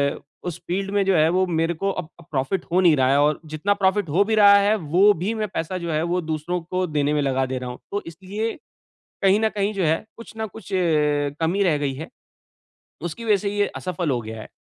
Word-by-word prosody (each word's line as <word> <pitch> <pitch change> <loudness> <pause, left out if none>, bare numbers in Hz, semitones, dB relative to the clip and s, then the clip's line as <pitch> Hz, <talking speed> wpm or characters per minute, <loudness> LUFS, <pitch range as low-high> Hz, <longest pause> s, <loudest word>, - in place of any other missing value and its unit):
अ, - - -11 0.2
उस 175 -2 -5
फ़ील्ड 195 +2 -2
में 200 -1 +2
जो 195 -2 +3
है 155 0 +5
वो 185 +2 +2
मेरे 165 0 0
को 195 +5 -2
अब 180 -4 -5
अब 170 - -15
प्रॉफ़िट 145 +6 -1
हो 185 +2 +4
नहीं 170 -4 +5
रहा 130 -1 +2
है 140 - +4
और 150 0 +2
जितना 195 +7 +1
प्रॉफ़िट 190 -2 +2
हो 185 +7 +3
भी 220 +1 +1
रहा 200 -1 +8
है 205 +2 +3 0.2
वो 185 - +5
भी 195 +7 -2
मैं 215 - 0
पैसा 175 +3 -2
जो 170 -2 -4
है 155 0 +1
वो 180 - +1
दूसरों 160 +2 -2
को 185 +2 -2
देने 150 -1 0
में 150 - +1
लगा 135 -1 +1
दे 130 0 -3
रहा 125 - -5
हूँ। 125 - -8
तो 205 - -1
इसलिए 195 +7 -4 0.7
कहीं 195 +2 +4
न 220 - +3
कहीं 200 +1 0
जो 190 -3 0
है 160 +5 +1
कुछ 230 -1 -12
ना 220 0 -2
कुछ 210 0 -12
अ, 190 - +2 0.6
कमी 180 +5 +1
रह 165 -6 +3
गई 140 -2 -1
है। 155 +5 -7 0.9
उसकी 175 +7 -5
वज़ह 210 -2 +4
से 200 - -1
ये 205 - +3
असफ़ल 175 -3 -3
हो 120 -2 0
गया 110 0 -7
है। - - -10
180 Hz, 250 wpm, -23 LUFS, 155-200 Hz, 0.9 s, रहा